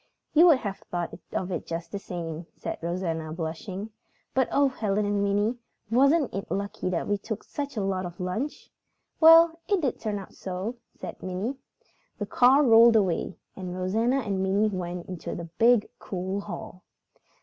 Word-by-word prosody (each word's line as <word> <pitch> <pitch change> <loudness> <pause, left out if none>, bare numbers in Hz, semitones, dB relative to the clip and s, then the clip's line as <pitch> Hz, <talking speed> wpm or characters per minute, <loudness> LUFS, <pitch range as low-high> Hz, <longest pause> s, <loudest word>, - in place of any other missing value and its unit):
"You 330 +3 +7
would 320 -6 +7
have 200 -5 -4
thought 175 -1 -3 0.2
of 185 0 -2
it 175 - -4
just 165 0 -5
the 200 - -3
same," 170 -3 -6
said - - -5
Rosanna, 165 -2 -2
blushing. 180 +6 -5 0.4
"But 260 -2 +2
oh, 280 0 +4
Helen 210 -5 -1
and 205 0 +1
Minnie, 205 +4 +1 0.3
wasn't 275 +4 +4
it 195 - -4
lucky 200 -2 -2
that 175 -2 -1
we 205 0 0
took 220 +1 -5
such 285 -4 -5
a 205 - 0
lot 190 -2 -1
of 175 0 -12
lunch?" 185 +11 -4 0.5
"Well, 330 0 +8
it 400 -2 +2
did 280 -7 -1
turn 210 -2 -2
out 195 - -9
so," 190 +6 -5 0.2
said - - -8
Minnie. 185 +7 -3 0.6
The 205 - -3
car 255 +7 +5
rolled 230 -2 +7
away, 190 -4 +1 0.2
and 180 -2 -6
Rosanna 225 +8 +1
and 200 -5 -2
Minnie 200 +3 +2
went 180 -2 -4
into 180 -3 -5
the 170 - -5
big, 235 -2 +5
cool 190 +1 -3
hall. 180 -1 -8
200 Hz, 170 wpm, -27 LUFS, 180-235 Hz, 0.6 s, Well